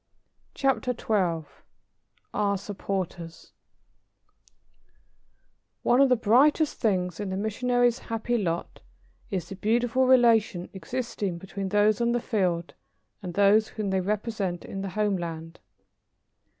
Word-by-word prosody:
CHAPTER 270 -2 0
XII 175 -7 0 0.9
OUR 200 -1 +1
SUPPORTERS 185 -4 -5 2.3
One 245 +3 +4
of 275 - +5
the 250 - +5
brightest 270 +8 +3
things 180 -6 0
in 205 -2 -3
the 190 - -3
missionary's 245 +3 +1
happy 230 +1 -2
lot 170 -4 -3 0.5
is 185 -5 -3
the 195 - -6
beautiful 240 +5 +1
relation 225 -8 +4
existing 200 -2 -4
between 190 +2 -5
those 210 +2 +3
on 235 0 +2
the 240 - +1
field 180 -8 -1 0.5
and 180 -3 -6
those 205 +2 +4
whom 210 -3 -4
they 190 0 +1
represent 200 -2 -2
in 195 - -6
the 195 - -4
homeland. 175 -5 -3
205 Hz, 115 wpm, -26 LUFS, 185-235 Hz, 2.3 s, of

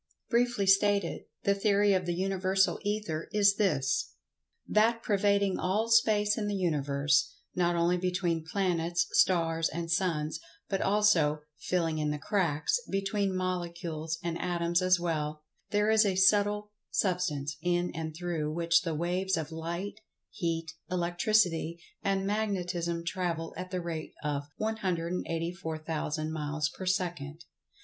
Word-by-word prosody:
Briefly 240 -4 +2
stated, 200 -1 +3 0.2
the 200 - +3
theory 200 0 +3
of 185 -2 0
the 175 - 0
Universal 190 +1 +1
Ether 205 -7 -3
is 205 -1 +4
this: 150 -11 +1 0.5
That 230 +2 +3
pervading 200 -2 +2
all 215 +5 0
Space 215 -2 +4
in 210 - -2
the 205 - -1
Universe—not 145 +1 0
only 170 +1 +2
between 180 -2 -1
planets, 175 0 0
stars 165 -3 +3
and 165 +1 -4
suns, 160 -4 0 0.3
but 195 - -1
also 180 -8 +3 0.2
"filling 165 -2 0
in 150 0 0
the 150 - -1
cracks" 165 - 0
between 195 0 0
molecules, 170 -3 -3
and 170 -1 -3
atoms 175 0 +1
as 185 -1 +4
well—there 160 +6 -2
is 220 0 +6
a 195 -3 +1
subtle 205 +2 +3 0.2
Substance 155 -7 -1
in 175 0 0
and 160 -1 -5
through 165 -3 -2
which 170 +1 +3
the 165 -3 -3
waves 180 +4 0
of 160 -1 -4
Light, 170 +6 -5 0.3
Heat,[Pg 165 -3 -3
100] 180 - -2
Electricity 175 -2 +1 0.2
and 195 -1 0
Magnetism 180 -5 -1
travel 170 -3 -2
at 185 - -6
the 180 -1 -2
rate 165 -2 -5
of 145 -1 -2
184,000 165 -5 -2
miles 150 0 -1
per 185 - -8
second. 170 -4 -2
175 Hz, 130 wpm, -30 LUFS, 165-195 Hz, 0.5 s, is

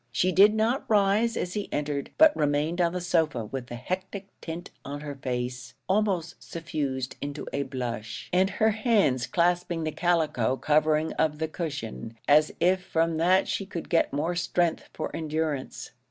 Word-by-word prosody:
She 185 +8 +2
did 205 +3 +6
not 225 +5 +1
rise 210 +2 +3
as 180 - -2
he 205 -1 -4
entered, 145 -1 -2
but 315 -1 +7
remained 150 +4 +1
on 170 -1 +3
the 180 - -3
sofa 160 -9 0
with 125 +2 -6
the 120 - -6
hectic 190 - -5
tint 170 +2 -6
on 145 +1 -6
her 145 -1 -5
face 125 -1 -4
almost 190 -4 0
suffused 140 -6 -4
into 145 +1 -5
a 140 - 0
blush, 125 -3 -5
and 185 +1 +4
her 220 +2 +2
hands 205 - +2
clasping 175 -1 +1
the 155 - -1
calico 155 -8 +1
covering 155 +2 +2
of 155 -1 +2
the 160 +1 -1
cushion, 140 -8 -5
as 150 +1 +5
if 180 +2 +3
from 165 -2 0
that 185 +4 +3
she 195 - -2
could 175 -4 -6
get 170 - +2
more 155 +5 -1
strength 175 -1 0
for 155 - -5
endurance. 155 -3 -3
160 Hz, 170 wpm, -27 LUFS, 140-185 Hz, -, but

